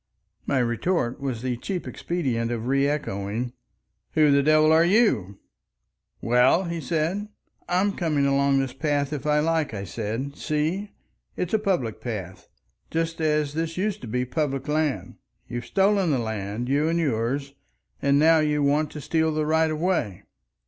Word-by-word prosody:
My 140 Hz, -, +1 dB
retort 120 Hz, +2 st, 0 dB
was 130 Hz, -4 st, -4 dB
the 125 Hz, -2 st, -1 dB
cheap 180 Hz, +8 st, -4 dB
expedient 130 Hz, -10 st, -2 dB
of 115 Hz, -1 st, -3 dB
re 135 Hz, +2 st, +2 dB
echoing, 120 Hz, -4 st, -3 dB, 0.6 s
"Who 155 Hz, -2 st, +4 dB
the 140 Hz, 0 st, +5 dB
devil 155 Hz, +1 st, +4 dB
are 160 Hz, +1 st, +6 dB
you?" 170 Hz, -, +2 dB, 0.9 s
"Well," 125 Hz, +9 st, +4 dB
he 170 Hz, -2 st, -4 dB
said. 165 Hz, +8 st, -1 dB, 0.4 s
"I'm 185 Hz, +3 st, +2 dB
coming 155 Hz, -7 st, 0 dB
along 140 Hz, 0 st, +3 dB
this 135 Hz, -2 st, -2 dB
path 145 Hz, 0 st, -1 dB
if 150 Hz, 0 st, -4 dB
I 150 Hz, 0 st, +3 dB
like," 160 Hz, -6 st, 0 dB
I 100 Hz, -, -4 dB
said. 115 Hz, +8 st, -4 dB
"See? 160 Hz, +8 st, -1 dB, 0.5 s
It's 180 Hz, +2 st, -3 dB
a 220 Hz, -, +4 dB
public 175 Hz, -, -1 dB
path—just 100 Hz, -, -6 dB
as 150 Hz, -2 st, +1 dB
this 165 Hz, +1 st, -3 dB
used 200 Hz, +1 st, -1 dB
to 125 Hz, -, -7 dB
be 125 Hz, +3 st, -1 dB
public 135 Hz, 0 st, -2 dB
land. 150 Hz, -2 st, -1 dB, 0.3 s
You've 120 Hz, 0 st, -5 dB
stolen 195 Hz, -2 st, +2 dB
the 140 Hz, -, +2 dB
land—you 115 Hz, +6 st, -1 dB
and 165 Hz, +1 st, +1 dB
yours, 140 Hz, -1 st, -1 dB, 0.5 s
and 140 Hz, 0 st, +3 dB
now 160 Hz, +2 st, +5 dB
you 150 Hz, -1 st, +1 dB
want 145 Hz, +2 st, +2 dB
to 150 Hz, -, -6 dB
steal 160 Hz, +1 st, +1 dB
the 155 Hz, 0 st, -1 dB
right 160 Hz, +1 st, +2 dB
of 155 Hz, -1 st, -3 dB
way. 160 Hz, -, -1 dB
145 Hz, 160 wpm, -25 LUFS, 125-160 Hz, 0.9 s, are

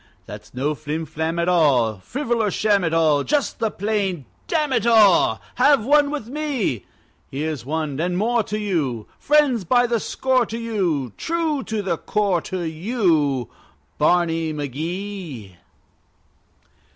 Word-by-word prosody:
That's -, -, -10 dB
no 140 Hz, +4 st, -1 dB
flim 155 Hz, +2 st, -4 dB
flam 160 Hz, +2 st, -3 dB
at 170 Hz, 0 st, 0 dB
all, 135 Hz, -, +3 dB
Frivol 240 Hz, -, -2 dB
or 210 Hz, -, +1 dB
sham 205 Hz, -1 st, +1 dB
at 165 Hz, -, 0 dB
all, 155 Hz, -3 st, +3 dB
Just 290 Hz, -3 st, -1 dB
the 225 Hz, -, +1 dB
plain 200 Hz, -8 st, -2 dB, 0.2 s
Damn 305 Hz, -4 st, 0 dB
it 230 Hz, -2 st, +1 dB
all, 235 Hz, -, +5 dB, 0.2 s
Have 285 Hz, -7 st, +4 dB
one 290 Hz, +1 st, +4 dB
with 285 Hz, -7 st, -4 dB
me! 265 Hz, -, -2 dB, 0.4 s
Here's 145 Hz, -2 st, -4 dB
one 155 Hz, -2 st, -2 dB
and 175 Hz, +2 st, -1 dB
more 235 Hz, +4 st, +2 dB
to 210 Hz, -, -3 dB
you! 155 Hz, -, -2 dB
Friends 285 Hz, -7 st, +3 dB
by 245 Hz, +8 st, +3 dB
the 235 Hz, -1 st, 0 dB
score 255 Hz, +2 st, 0 dB
to 230 Hz, -, -5 dB
you, 180 Hz, -, -1 dB
True 325 Hz, -4 st, -1 dB
to 220 Hz, -2 st, -3 dB
the 175 Hz, -4 st, -1 dB
core 200 Hz, -5 st, 0 dB
to 185 Hz, +2 st, -5 dB
you, 160 Hz, -, 0 dB, 0.5 s
Barney 165 Hz, 0 st, +2 dB
McGee! 150 Hz, -, -5 dB
185 Hz, 145 wpm, -22 LUFS, 155-235 Hz, 0.5 s, all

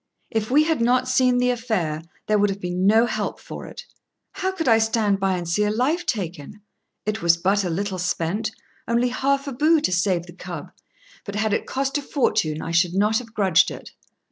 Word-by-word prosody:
If 220 Hz, -2 st, -1 dB
we 290 Hz, +4 st, +5 dB
had 315 Hz, -5 st, 0 dB
not 250 Hz, +2 st, +2 dB
seen 255 Hz, 0 st, +3 dB
the 250 Hz, 0 st, +2 dB
affair, 215 Hz, -11 st, -2 dB, 0.2 s
there 215 Hz, -1 st, +2 dB
would 205 Hz, 0 st, +3 dB
have 195 Hz, 0 st, -4 dB
been 180 Hz, 0 st, -1 dB
no 220 Hz, +3 st, +5 dB
help -, -, -3 dB
for -, -, -9 dB
it. -, -, -9 dB, 0.5 s
How 380 Hz, 0 st, -2 dB
could 345 Hz, -6 st, -4 dB
I 225 Hz, -2 st, +6 dB
stand 220 Hz, -3 st, +1 dB
by 190 Hz, -1 st, +1 dB
and 175 Hz, -1 st, -5 dB
see 210 Hz, +5 st, +1 dB
life 280 Hz, +11 st, 0 dB
taken? 180 Hz, -, -4 dB, 0.5 s
It 215 Hz, +1 st, -2 dB
was 170 Hz, 0 st, +4 dB
but 195 Hz, +4 st, +1 dB
a 180 Hz, -, -2 dB
little 190 Hz, +3 st, -2 dB
I -, -, -4 dB
spent 180 Hz, +5 st, -1 dB, 0.4 s
only 235 Hz, +2 st, +2 dB
half 275 Hz, +2 st, 0 dB
a -, -, -3 dB
bu 310 Hz, +5 st, +4 dB
to 185 Hz, -, 0 dB
save 175 Hz, -1 st, +1 dB
the 175 Hz, -, -12 dB
cub, 185 Hz, -, -8 dB, 0.5 s
but 200 Hz, -, -7 dB
had 215 Hz, 0 st, 0 dB
it -, -, -1 dB
cost 275 Hz, +2 st, -1 dB
a -, -, -5 dB
fortune 215 Hz, -, 0 dB
I 165 Hz, -, -4 dB
should 170 Hz, +1 st, +2 dB
not 210 Hz, +3 st, +2 dB
have 230 Hz, -2 st, -12 dB
grudged 190 Hz, -5 st, +4 dB
it. -, -, -9 dB
215 Hz, 215 wpm, -23 LUFS, 185-250 Hz, 0.5 s, I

